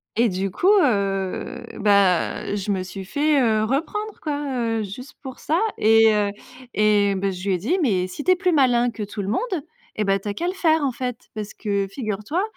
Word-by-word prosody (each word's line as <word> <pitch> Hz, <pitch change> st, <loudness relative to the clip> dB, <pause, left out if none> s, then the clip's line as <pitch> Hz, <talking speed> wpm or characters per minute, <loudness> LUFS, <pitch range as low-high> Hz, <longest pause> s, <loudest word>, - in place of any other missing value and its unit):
Et 235 Hz, +1 st, +3 dB
du 190 Hz, +1 st, -2 dB
coup 355 Hz, -, 0 dB, 0.2 s
heu, 195 Hz, -6 st, -1 dB
bah 200 Hz, -3 st, +2 dB
je 205 Hz, 0 st, -4 dB
me 190 Hz, -2 st, -1 dB
suis 190 Hz, +1 st, -7 dB
fait, 290 Hz, +7 st, +1 dB
heu, 220 Hz, -3 st, +2 dB
reprendre 345 Hz, -, -2 dB
quoi, 295 Hz, -2 st, -2 dB, 0.4 s
heu, -, -, -1 dB
juste 250 Hz, +8 st, -9 dB
pour 260 Hz, -2 st, -8 dB
ça 320 Hz, +3 st, 0 dB, 0.2 s
et 225 Hz, 0 st, +5 dB
heu 205 Hz, -1 st, +1 dB, 0.5 s
et 205 Hz, -1 st, +3 dB
bah 195 Hz, 0 st, -1 dB
je 185 Hz, +2 st, -6 dB
lui 190 Hz, -, +2 dB
ai -, -, -1 dB
dit: 290 Hz, -, 0 dB
«Mais 190 Hz, -10 st, +1 dB
si 185 Hz, +11 st, -7 dB
tu -, -, -1 dB
es -, -, +6 dB
plus 365 Hz, 0 st, +1 dB
malin 245 Hz, -5 st, +3 dB
que 225 Hz, -, -8 dB
tout 205 Hz, 0 st, -4 dB
le -, -, -5 dB
monde, 340 Hz, -, -2 dB, 0.3 s
et 215 Hz, -, 0 dB
bah 195 Hz, -1 st, +1 dB
tu 195 Hz, -, -9 dB
as 205 Hz, -, -3 dB
qu'à 340 Hz, -, -3 dB
le 365 Hz, -, -1 dB
faire, 320 Hz, -4 st, +2 dB
en 275 Hz, -, +1 dB
fait, 250 Hz, -1 st, -5 dB
parce 215 Hz, -1 st, -6 dB
que 200 Hz, -2 st, -1 dB
figure-toi 215 Hz, -, -3 dB
215 Hz, 220 wpm, -23 LUFS, 200-285 Hz, 0.5 s, es